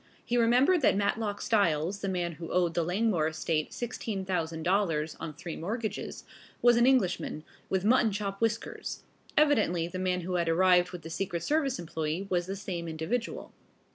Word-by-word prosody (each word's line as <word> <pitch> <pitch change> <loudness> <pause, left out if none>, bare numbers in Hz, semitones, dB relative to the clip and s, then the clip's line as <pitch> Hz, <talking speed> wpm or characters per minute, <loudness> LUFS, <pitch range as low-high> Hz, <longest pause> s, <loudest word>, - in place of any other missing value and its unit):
He 240 - -1
remembered 250 +9 +4
that 245 - +4
Matlock 205 0 -1
Styles, 190 -3 +1
the 195 - -1
man 175 -2 -1
who 165 +1 -8
owed 175 -2 +2
the 170 - +1
Langmore 180 -2 +1
estate 155 0 -1
$16,000 180 -6 -1
on 160 - -5
three 170 +1 -6
mortgages, 215 +5 -4 0.4
was 240 0 +5
an 240 +1 +4
Englishman, 185 -11 +1 0.3
with 190 0 0
mutton 230 -1 +4
chop 200 0 -4
whiskers. 225 0 -2 0.3
Evidently 215 - +3
the 185 +2 -6
man 180 -1 0
who 180 +1 -2
had 170 -1 0
arrived 180 +1 +4
with 180 -3 -8
the 165 - -8
secret 175 -1 -3
service 280 - +1
employee 160 +2 -3
was 175 -1 +1
the 195 - -3
same 185 -4 -5
individual. 165 +10 -3
185 Hz, 165 wpm, -29 LUFS, 170-220 Hz, 0.4 s, was